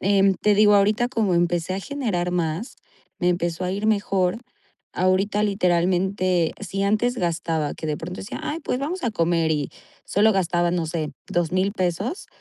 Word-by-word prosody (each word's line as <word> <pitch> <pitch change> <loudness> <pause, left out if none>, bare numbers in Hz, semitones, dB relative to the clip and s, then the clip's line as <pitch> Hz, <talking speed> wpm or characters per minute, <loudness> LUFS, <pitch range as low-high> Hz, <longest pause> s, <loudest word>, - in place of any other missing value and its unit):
em, 195 0 +3
te 210 +2 +2
digo 210 0 +5
ahorita 210 +4 +3
como 220 -7 +1
empecé 175 +1 +1
a 195 - -3
generar 210 -9 -2
más, 175 - -2 0.4
me 180 - +1
empezó 175 0 -1
a 180 - -1
ir 200 +3 -2
mejor. 195 -2 +1 0.5
Ahorita, 190 +3 +1
literalmente, 185 -2 +1
si 195 0 -3
antes 215 +5 +1
gastaba 165 -5 -1
que 160 - -6
de 150 -1 -1
pronto 180 +4 -7
decía: 195 - -6
"Ay, 305 - -3
pues, 250 - -2
vamos 320 +6 -3
a 240 - +1
comer", 165 -4 +1
y 145 -2 -2 0.3
solo 215 +2 +3
gastaba, 175 -2 +1
no 170 -2 -1
sé, 160 -2 -3 0.2
$2000 185 +3 0
pesos 195 - -2
185 Hz, 170 wpm, -23 LUFS, 175-205 Hz, 0.5 s, digo